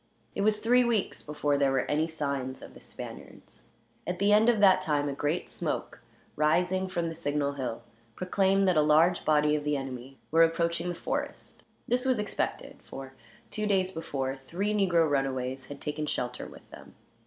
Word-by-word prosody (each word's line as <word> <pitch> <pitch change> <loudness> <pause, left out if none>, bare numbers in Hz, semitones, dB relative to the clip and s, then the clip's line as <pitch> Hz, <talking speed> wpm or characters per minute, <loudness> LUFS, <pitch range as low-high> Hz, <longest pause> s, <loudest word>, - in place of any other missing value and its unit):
It - - -2
was 210 +1 +3
three 245 +3 +4
weeks 230 -5 0
before 145 -1 -1
there 140 -1 +3
were 135 -1 +1
any 155 +2 +1
signs 140 -5 -4
of - - -11
the - - -15
Spaniards. - - -11 0.4
At 180 +1 -2
the 200 +2 +3
end 215 +3 +5
of 230 -3 +3
that 195 -2 +6
time 145 -2 0
a 140 - -2
great 145 +5 -1
smoke, - - -4 0.3
rising 180 +5 +2
from 170 -2 -2
the 165 - -4
signal 145 -3 -1
hill, 130 -4 -4 0.3
proclaimed 195 +1 +2
that 185 - +3
a - - +6
large 160 +4 +4
body 150 -1 +3
of 150 - -2
the 150 -1 0
enemy 135 0 -7
were 165 +1 +5
approaching 170 +1 +2
the 175 - -3
forest. - - -4 0.3
This 250 +1 +1
was 260 -2 +2
expected; 210 -1 -3
for, 135 0 -9 0.4
two 215 0 -1
days 190 -2 +2
before, 135 -5 -3
three 200 +5 -1
negro 180 -6 +3
runaways 135 -2 -1
had 145 +1 -9
taken 150 0 -3
shelter 125 -3 -3
with - - -14
them. - - -13
160 Hz, 185 wpm, -29 LUFS, 140-190 Hz, 0.4 s, that